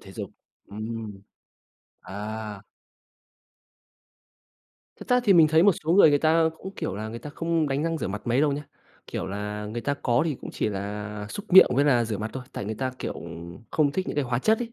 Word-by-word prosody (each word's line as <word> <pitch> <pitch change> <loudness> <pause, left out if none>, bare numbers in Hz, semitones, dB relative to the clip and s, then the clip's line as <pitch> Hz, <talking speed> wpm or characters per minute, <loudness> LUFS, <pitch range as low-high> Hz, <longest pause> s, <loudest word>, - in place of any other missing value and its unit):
Thể - - -13
dục, - - -6 0.4
ừm. 110 -1 -6 0.8
À. 105 +1 -6 2.4
Thật - - -10
ra 250 0 +4
thì 205 - +6
mình 165 -4 +7
thấy 160 +2 +5
một 200 +2 +6
số 160 - +2
người, 185 -4 +7
người 145 - +4
ta 160 +2 +3
cũng 190 +1 -8
kiểu - - -3
là 110 +1 -4
người 115 +1 -6
ta 150 - -8
không 165 0 0
đánh 135 +2 0
răng 165 -1 -1
rửa - - -3
mặt 105 +2 -5
mấy 120 +3 +2
đâu 150 -1 +3
nhá. 145 +1 -3 0.4
Kiểu - - -4
là, 105 +2 -4
người 110 +3 -4
ta 140 +5 -1
có 120 -3 +1
thì 160 -3 -1
cũng - - -7
chỉ - - -1
là 105 +1 -5
súc 205 - -8
miệng 190 - +10
với 140 - +3
là 125 -5 +4
rửa 110 -3 -3
mặt 110 +1 -4
thôi, 130 - -5
tại - - -5
người 110 +2 -3
ta, 130 +3 -2
kiểu, - - -3 0.6
không 145 -3 +2
thích 185 +2 -2
những - - -3
cái 145 - +1
hóa 120 -1 -1
chất 220 - +3
ấy. 235 -1 -5
130 Hz, 220 wpm, -26 LUFS, 105-160 Hz, 2.4 s, miệng